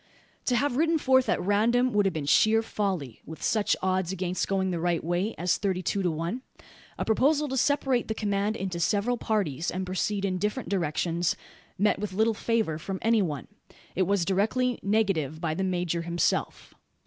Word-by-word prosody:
To 250 - +2
have 260 +1 +1
ridden 325 +2 +3
forth 260 -3 +3
at - - +2
random 235 +6 +2
would 205 -1 +3
have 190 - -1
been 155 -3 -3
sheer 220 +9 +4
folly; 185 - -3
with 160 +1 -10
such 215 -2 +2
odds 185 -1 0
against 185 -1 -2
going 190 -1 0
the 175 - -2
right 170 0 0
way, 175 +6 -1
as 175 +1 +1
thirty 190 -2 -1
two 195 +4 0
to 180 - +1
one. 170 +9 -3 0.6
A - - -2
proposal 285 +7 +2
to 265 - -2
separate 265 -1 +1
the 220 - -2
command 205 0 0
into 185 -4 -4
several 205 +7 +1
parties, 185 - -1
and 185 +1 -3
proceed 195 +2 -1
in 185 -2 -1
different 210 +6 -2
directions, 170 -1 0 0.4
met 205 0 +2
with 205 -2 -4
little 220 +3 +2
favour 220 -8 -1
from 190 +3 -4
any 225 -1 +4
one. 150 -8 -3 0.5
It 185 -1 +1
was 200 -3 +1
directly 225 +6 +1
negatived 195 -8 0
by 160 -2 -1
the 190 +4 -2
major 175 -2 -1
himself. 170 +1 -1
195 Hz, 185 wpm, -27 LUFS, 175-220 Hz, 0.6 s, sheer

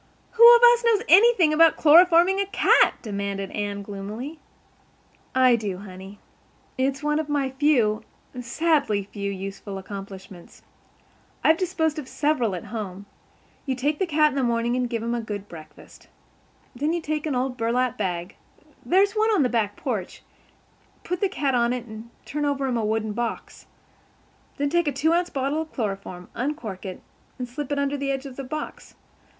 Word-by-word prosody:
"Who 470 +1 +9
of 475 - +3
us 480 0 +7
knows 455 -2 +3
anything 385 -5 +6
about 325 +1 +5
chloroforming 345 +4 +6
a 395 - -2
cat?" - - +4
demanded 200 -2 -4
Anne 205 -1 -4
gloomily. 215 +10 -7 1.0
"I 255 -2 +5
do, 205 -5 -4
honey. 190 +1 -11 0.6
It's 270 +2 -1
one 300 +1 +1
of 310 -1 -4
my 280 -2 0
few—sadly 250 -1 0
few—useful 195 0 -5
accomplishments. 195 -2 -10 0.8
I've 320 - +5
disposed 320 -4 -1
of 280 - -8
several 260 -11 0
at 175 - -6
home. 200 -3 -6 0.6
You 265 - 0
take 290 +4 -1
the 380 - 0
cat 305 -1 +3
in - - -7
the 275 - 0
morning 235 0 0
and 250 -1 -1
give 230 -2 -3
him 235 +1 -2
a 240 - -1
good 205 -2 -6
breakfast. 160 -4 -14 0.7
Then 295 +6 -1
you 345 - -2
take 305 0 -2
an 285 - -1
old 250 0 -1
burlap 250 +1 0
bag—there's 205 - -2
one 435 0 +2
in 345 - +3
the 250 - +1
back 215 -4 -1
porch—put 250 - -8
the 400 - +2
cat 280 -7 -1
on 240 0 +2
it 245 -1 -5
and 220 0 -10 0.2
turn 295 +2 -3
over 280 -1 0
him 250 -3 -1
a 225 - -1
wooden 215 0 -1
box. 235 +1 -5 0.9
Then 285 0 -1
take 345 -1 +1
a - - +2
two 305 +5 +1
ounce 350 +1 +1
bottle 275 +2 -1
of 315 - -8
chloroform, 195 -5 -5
uncork 235 - -4
it, 185 - -8 0.3
and 250 -2 -5
slip 275 +3 -6
it 285 - 0
under 280 0 -1
the 275 0 -3
edge 270 0 -2
of 265 -2 -8
the 275 - -6
box. 305 +4 -7
255 Hz, 170 wpm, -24 LUFS, 210-305 Hz, 1.0 s, Who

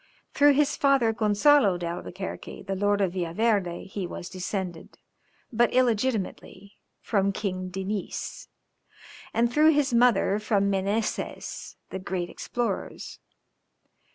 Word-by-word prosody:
Through 290 0 +6
his 290 +1 +2
father 270 -5 +3
Gonzalo 215 0 +4
d'Albuquerque, 175 +3 -6
the 195 0 -3
Lord 205 +1 +1
of 185 -3 +1
Villaverde, 185 0 0
he 195 -1 -5
was 175 - -7
descended, 185 -2 -5 0.6
but 235 +1 +3
illegitimately, 225 -4 -1 0.2
from 200 -2 +1
King 185 -2 -3
Diniz; 190 +1 -5 0.8
and 235 +1 +1
through 310 +2 +5
his 285 -3 +1
mother 235 -4 +3
from 200 -2 +1
the 195 - +2
Menezez, 205 +3 -3 0.2
the 190 - -4
great 185 -2 -4
explorers. 240 -1 -4
205 Hz, 115 wpm, -26 LUFS, 190-235 Hz, 0.8 s, Through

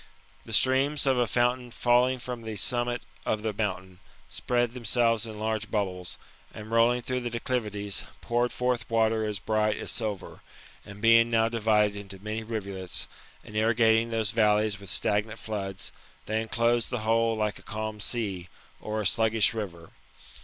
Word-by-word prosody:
The - - -10
streams 135 +3 +3
of 130 -2 +3
a 120 - +2
fountain 125 +2 +1
falling 125 +2 +3
from 125 -1 -6
the 110 -1 -5
summit 120 +3 -1 0.2
of 110 0 -1
a 110 - 0
mountain, 95 -3 -3 0.3
spread 120 -1 0
themselves 115 -1 +1
in 110 -1 -7
large 110 -1 -2
bubbles, 95 -4 -2 0.3
and 110 0 -9
rolling 120 +2 +3
through 130 +1 -1
the 120 -1 -3
declivities, 105 -4 -2 0.2
poured 120 +1 0
forth 125 -3 -1
water 110 -1 +2
as 105 -1 -2
bright 105 +1 +1
as - - -3
silver; 105 -4 -4 0.4
and 100 0 -11
being 115 +1 +6
now 115 -1 +3
divided 105 -2 +2
into 100 -1 -8
many 105 +3 -4
rivulets, 100 -5 -4 0.4
and 105 - -12
irrigating 115 +1 +3
those 110 -2 0
valleys 105 -1 +2
with 100 -2 -10
stagnant 105 +3 0
floods, 100 -3 -5 0.3
they 110 +1 0
enclosed 115 +1 +1
the 120 -3 -2
whole 115 +1 +2
like 105 -1 -1
a - - -15
calm 110 0 -5
sea, 100 -6 -2 0.3
or 110 0 -3
a - - -4
sluggish 110 +1 +3
river. 85 -7 -6
110 Hz, 160 wpm, -28 LUFS, 105-120 Hz, 0.4 s, being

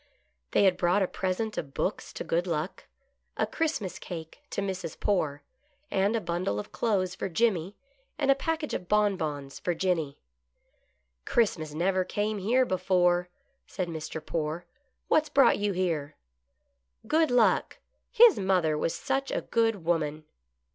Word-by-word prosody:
They - - +3
had 185 -2 +4
brought 180 +3 +3
a - - +1
present 195 +5 -2
of 135 -2 -8
books 195 - -2
to - - -5
Good 170 +2 0
Luck, 165 +1 -3 0.5
a - - +2
Christmas 305 - -2
cake 165 - -8
to - - -3
Mrs. 185 -4 -4
Poore, 150 -8 0 0.5
and 200 +4 +2
a - - +2
bundle 170 - -2
of 105 - -7
clothes 190 -5 0
for 190 - -4
Jimmy, 195 -1 +1 0.4
and 275 -2 +3
a - - +8
package 315 +2 -2
of 180 - -4
bonbons 160 -10 0
for 175 - -1
Jenny. 165 -5 -1 0.6
" 60 0 -45
Christmas 160 -10 +1
never 185 +3 +1
came 210 +2 -2
here 245 +7 +3
before," 180 -3 +2 0.4
said 180 -3 -3
Mr. 160 -1 -6
Poore. 160 +2 -3 0.2
" 260 - -48
What's 310 -1 +3
brought 275 -6 +5
you 205 0 +1
here 165 -6 -1 0.3
" 60 0 -49
" 60 - -33
Good 315 +6 +3
Luck; 245 -2 +3 0.3
his 465 - +7
mother 185 -5 +2
was 155 +2 -1
such 270 0 -1
a - - -1
good 225 -6 0
woman." 155 -2 0
185 Hz, 160 wpm, -28 LUFS, 160-210 Hz, 0.6 s, a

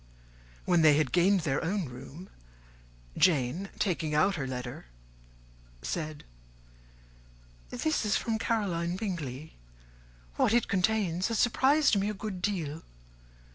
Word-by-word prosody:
When 175 -2 +3
they 150 -2 +6
had 150 -4 +1
gained 185 +2 +3
their 145 -3 -1
own 185 +2 -1
room, 135 +8 -10 0.9
Jane, 160 +3 +2
taking 160 -6 -1
out 190 +6 +3
her 140 -7 -3
letter, 125 - -6 1.0
said, 155 -3 -4 1.5
"This 315 -5 -1
is 210 -2 +2
from 225 -1 -2
Caroline 180 -7 -1
Bingley: 160 - -5 0.8
what 225 - +3
it 240 - +2
contains 190 -2 +1
has 230 - -1
surprised 265 0 +3
me 200 +2 0
a 215 - -4
good 195 -3 -5
deal. 165 -6 -2
180 Hz, 120 wpm, -29 LUFS, 155-205 Hz, 1.5 s, they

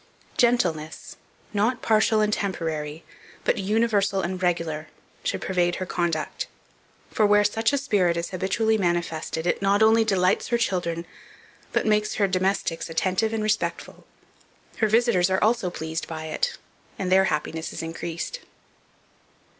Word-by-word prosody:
Gentleness, 175 -11 0 0.4
not 220 +5 +1
partial 220 0 +3
and 210 0 +2
temporary, 160 -6 -3 0.4
but - - +1
universal 205 -1 +1
and 185 +1 -3
regular, 165 -3 -1 0.4
should - - -2
pervade 175 -2 +1
her 185 - -3
conduct; 170 - -2 0.6
for 220 - +1
where 205 0 +5
such 225 +2 +1
a 285 - +1
spirit 195 -11 +1
is 170 - -3
habitually 210 +4 +1
manifested, 170 -2 -1
it 175 - 0
not 200 +2 +3
only 225 +1 +5
delights 190 -3 +2
her 240 - +1
children, 175 -6 -1 0.7
but - - 0
makes 210 0 +2
her 200 - +2
domestics 185 -3 -1
attentive 185 +6 0
and 220 -1 -1
respectful; 215 0 -2 0.7
her 220 - +2
visitors 215 -5 +3
are 190 0 +1
also 220 -3 +2
pleased 160 -1 -4
by 160 -1 -6
it, 485 - -1 0.4
and 185 -2 -2
their 190 +1 +6
happiness 160 0 -2
is - - -5
increased. 165 - -5
190 Hz, 140 wpm, -25 LUFS, 170-220 Hz, 0.7 s, their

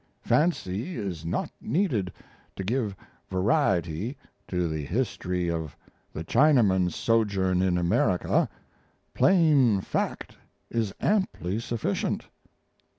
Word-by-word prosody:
Fancy 155 - 0
is 90 -6 -4
not - - -2
needed 120 - 0 0.4
to 95 - -4
give 110 -1 -1 0.3
variety 95 - +1 0.3
to 90 -2 0
the 80 -2 -3
history 90 - -2
of 80 -4 -3 0.3
the 80 - -5
Chinaman's 100 - +3
sojourn 100 -5 +1
in 90 -2 +2
America. 90 +1 +2 0.6
Plain 150 - +4
fact - - -3 0.3
is 115 -4 0
amply 185 - 0
sufficient." 115 -2 -2
100 Hz, 95 wpm, -27 LUFS, 90-125 Hz, 0.6 s, Plain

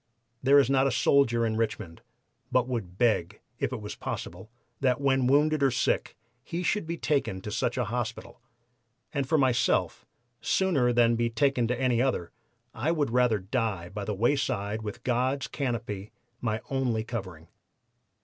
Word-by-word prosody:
There 140 +2 +5
is 140 - +5
not 135 0 +3
a - - +1
soldier 120 -1 +3
in 110 -1 -1
Richmond 105 -7 -3 0.5
but 125 -1 +2
would 105 -8 -4
beg, 105 -5 +1 0.2
if 135 -2 -1
it 125 -4 -4
was 105 - -6
possible, 90 +5 -6 0.3
that 130 -1 +2
when 135 -2 +2
wounded 150 +3 +3
or 135 - +5
sick - - 0 0.3
he 175 +2 -4
should 210 +1 0
to - - -14
be 170 +1 -3
taken 140 -12 0
to 105 - -6
such 120 +4 -1
an 125 - +1
hospital, 115 +1 -5 0.7
and 140 -3 -2
for 160 - +4
myself, 130 -4 +1 0.4
sooner 150 -11 +2
than 120 -1 +4
be 115 0 +1
taken 120 +1 +1
to 125 +1 -1
any 125 -3 +2
other, 125 -10 -1 0.4
I 135 +9 0
would 150 -7 0
rather 125 -2 +3
die 100 -3 -2
by 100 +2 -5
the 105 - -2
wayside 110 -3 0
with 110 +3 -7
God's 130 +2 0
canopy 115 -7 -4 0.3
my 110 -1 -1
only 125 -5 0
covering. 95 -8 -7
120 Hz, 170 wpm, -28 LUFS, 110-135 Hz, 0.7 s, There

